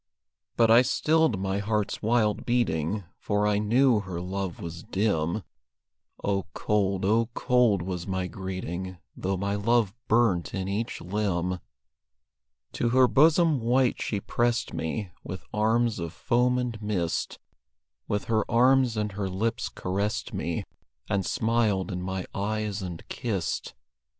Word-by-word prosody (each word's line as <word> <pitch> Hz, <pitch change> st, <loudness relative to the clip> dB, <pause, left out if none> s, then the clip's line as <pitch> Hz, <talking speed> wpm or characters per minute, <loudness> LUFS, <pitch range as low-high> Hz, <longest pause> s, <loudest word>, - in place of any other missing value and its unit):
But 115 Hz, -1 st, +5 dB
I 115 Hz, +2 st, +8 dB
stilled 150 Hz, -2 st, +2 dB
my 95 Hz, +1 st, -1 dB
heart's 105 Hz, 0 st, -1 dB
wild 110 Hz, -1 st, +2 dB
beating, 105 Hz, -5 st, 0 dB, 0.2 s
For 105 Hz, 0 st, 0 dB
I 105 Hz, -1 st, +2 dB
knew 120 Hz, +2 st, +4 dB
her 95 Hz, -4 st, -5 dB
love 95 Hz, 0 st, -4 dB
was 85 Hz, 0 st, -6 dB
dim; 95 Hz, -1 st, 0 dB, 0.8 s
Oh, 100 Hz, -1 st, 0 dB
cold, 100 Hz, -2 st, 0 dB
oh, 115 Hz, +3 st, +2 dB
cold 125 Hz, -7 st, +3 dB
was 90 Hz, -1 st, -4 dB
my 95 Hz, -1 st, -1 dB
greeting, 95 Hz, 0 st, -5 dB, 0.2 s
Though 95 Hz, +1 st, -2 dB
my 100 Hz, +2 st, -1 dB
love 105 Hz, 0 st, +2 dB
burnt 110 Hz, -7 st, +2 dB
in 95 Hz, -1 st, -2 dB
each 105 Hz, +4 st, -3 dB
limb. 90 Hz, -2 st, -1 dB, 1.1 s
To 120 Hz, -, 0 dB
her 130 Hz, +1 st, +5 dB
bosom 155 Hz, +2 st, +4 dB
white 125 Hz, +2 st, +2 dB
she 105 Hz, -, -1 dB
pressed 120 Hz, +3 st, 0 dB
me 90 Hz, +4 st, -3 dB
With 95 Hz, -, -7 dB
arms 110 Hz, +1 st, +2 dB
of 85 Hz, -1 st, -4 dB
foam 125 Hz, 0 st, +2 dB
and 120 Hz, -3 st, -3 dB
mist; 95 Hz, -6 st, -1 dB, 0.7 s
With 105 Hz, 0 st, -1 dB
her 110 Hz, -1 st, +1 dB
arms 125 Hz, 0 st, +4 dB
and 105 Hz, -1 st, -1 dB
her 100 Hz, 0 st, -3 dB
lips 110 Hz, +5 st, -1 dB
caressed 100 Hz, +3 st, -2 dB
me, -, -, -2 dB, 0.5 s
And 100 Hz, -2 st, +1 dB
smiled 110 Hz, -3 st, +1 dB
in 90 Hz, 0 st, -3 dB
my 95 Hz, 0 st, -3 dB
eyes 105 Hz, 0 st, -2 dB
and 90 Hz, -3 st, -7 dB
kissed. 100 Hz, -8 st, -3 dB
105 Hz, 140 wpm, -27 LUFS, 95-115 Hz, 1.1 s, I